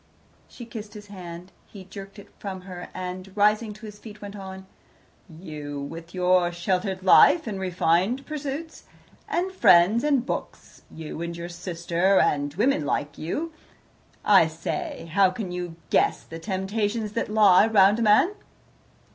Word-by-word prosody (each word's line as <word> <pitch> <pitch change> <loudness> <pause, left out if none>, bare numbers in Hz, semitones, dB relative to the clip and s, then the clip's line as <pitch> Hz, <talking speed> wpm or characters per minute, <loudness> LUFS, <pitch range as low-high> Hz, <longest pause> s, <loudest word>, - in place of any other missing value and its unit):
" - - -34
She 240 - -8
kissed 220 -2 -9
his 205 -1 -11
hand. 175 -1 -9 0.2
He 195 -3 -12
jerked 195 +2 -10
it 205 - -13
from 190 -2 -6
her, 180 -1 -9
and, 185 +1 -6
rising 210 +2 +3
to 215 +2 -12
his 210 -1 -10
feet, 210 -1 -11
went 205 0 -8
on: 190 -1 -9 0.6
"You, 150 -3 -7
with 165 +4 -8
your 180 -1 +3
sheltered 185 +2 -2
life, 290 - +6
and 205 -4 -4
refined 185 +7 +1
pursuits, 305 +1 -6 0.4
and 365 +2 -1
friends, 205 - +5
and 280 -5 +2
books, - - -6
you 160 0 -8
and 170 0 -4
your 170 0 -6
sister, 175 +2 0
and 145 0 +1
women 230 - +2
like 145 0 -2
you 310 - -3 0.7
I 195 -6 +6
say, 165 0 -5
how 195 0 +5
can 185 0 -5
you 175 -2 -5 0.2
guess - - +2
the 165 - -9
temptations 205 +3 -2
that 230 - -2
lie 210 -2 +6
round 205 0 +5
a - - -1
man?" 220 - +4
190 Hz, 155 wpm, -25 LUFS, 175-215 Hz, 0.7 s, life